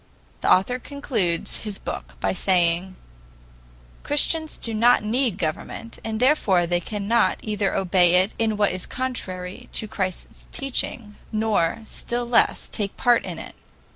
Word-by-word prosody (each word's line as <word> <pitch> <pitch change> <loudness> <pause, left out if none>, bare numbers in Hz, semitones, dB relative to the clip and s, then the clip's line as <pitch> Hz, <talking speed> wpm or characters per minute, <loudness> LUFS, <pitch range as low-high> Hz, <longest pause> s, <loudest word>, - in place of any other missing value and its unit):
The - - +1
author 245 +7 +3
concludes 210 - -1
his 210 -3 -6
book - - -6
by - - 0
saying: 180 0 +1 1.1
"Christians 315 +2 +2
do 230 - -3
not 235 +1 +4
need 230 -1 0
government, 180 +7 -4
and 220 -1 -3
therefore 225 - +3
they 175 +1 +1
cannot 210 +5 +1
either 210 -2 -1
obey 180 -2 +3
it 185 +3 +3
in 220 -2 +1
what 205 -1 +3
is 185 0 -4
contrary 190 -8 -5
to 215 - 0
Christ's 185 -3 -4
teaching 240 -5 -3
nor, 215 -2 +1
still 240 +2 -3
less, 235 -1 +3
take 200 -2 -3
part 240 -1 +4
in - - -5
it." - - -9
210 Hz, 140 wpm, -24 LUFS, 185-240 Hz, 1.1 s, not